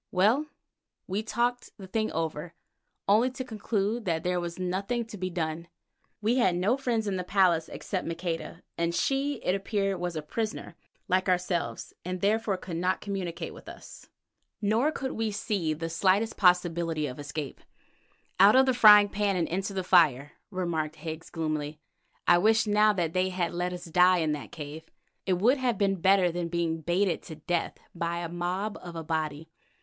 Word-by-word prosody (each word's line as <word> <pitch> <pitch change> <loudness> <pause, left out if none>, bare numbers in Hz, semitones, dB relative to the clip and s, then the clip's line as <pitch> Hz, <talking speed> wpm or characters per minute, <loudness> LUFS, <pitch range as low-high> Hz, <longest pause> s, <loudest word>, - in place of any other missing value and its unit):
Well, 220 +11 +2 0.6
we 195 +3 -2
talked 240 +3 -1
the 195 - -9
thing 215 +3 -1
over, 165 +1 -3 0.5
only 220 +6 +4
to 260 0 -6
conclude 220 -1 -2
that 165 -3 -1
there 180 0 0
was 170 -1 -5
nothing 195 +6 -2
to 220 - -10
be 185 -2 -3
done. 170 -1 -3 0.6
We 230 +4 +2
had 190 -8 +3
no 190 +8 +2
friend 240 -5 -1
in 195 -2 -1
the 180 - -2
place 180 -3 +2
except 185 -4 -4
Maqueda, 165 0 -4 0.2
and 170 0 0
she, 275 +5 0
it 180 - +1
appeared, 195 -1 -1
was 175 -1 -3
a 155 - -3
prisoner 215 +8 -4 0.3
like 185 +1 +1
ourselves, 180 -1 -1
and 185 +1 -4
therefore 210 0 +1
could 175 -2 -6
not 180 +2 0
communicate 190 -4 -4
with - - -12
us. - - -12 0.5
Nor 220 +8 +2
could 270 -3 -4
we 225 0 -1
see 200 -5 -1
the 160 +2 -3
slightest 190 +6 +1
possibility 170 -4 +2
of 130 0 -6
escape. 145 -1 -6 0.8
"Out 200 +4 +8
of 265 0 +6
the 260 - +2
frying 210 -3 +8
pan 200 -1 0
into 190 +4 -2
the 190 -1 -2
fire," 150 -7 +4 0.2
remarked 170 -5 -2
Higgs 160 +1 -7
gloomily. 155 -2 -3 0.5
"I 175 - +6
wish 220 +3 +4
now 210 0 +4
that 170 -4 -1
they 185 0 +1
had 180 -2 -2
let 180 +1 -1
us 180 -1 -7
die 180 +2 +4
in 160 -3 +1
the 150 -2 -4
cave. 150 0 -8 0.5
It 190 - +3
would 235 +10 +3
have 245 -4 0
been 195 -3 +1
better 190 -1 +4
than 175 0 -3
being 165 -1 -1
baited 175 +3 +1
to 160 - -8
death 170 +2 -2 0.2
by 170 0 -2
a 170 -1 -4
mob 180 +5 -3
of 175 -1 -9
Abati." 160 -1 -3
180 Hz, 175 wpm, -28 LUFS, 165-210 Hz, 0.8 s, Out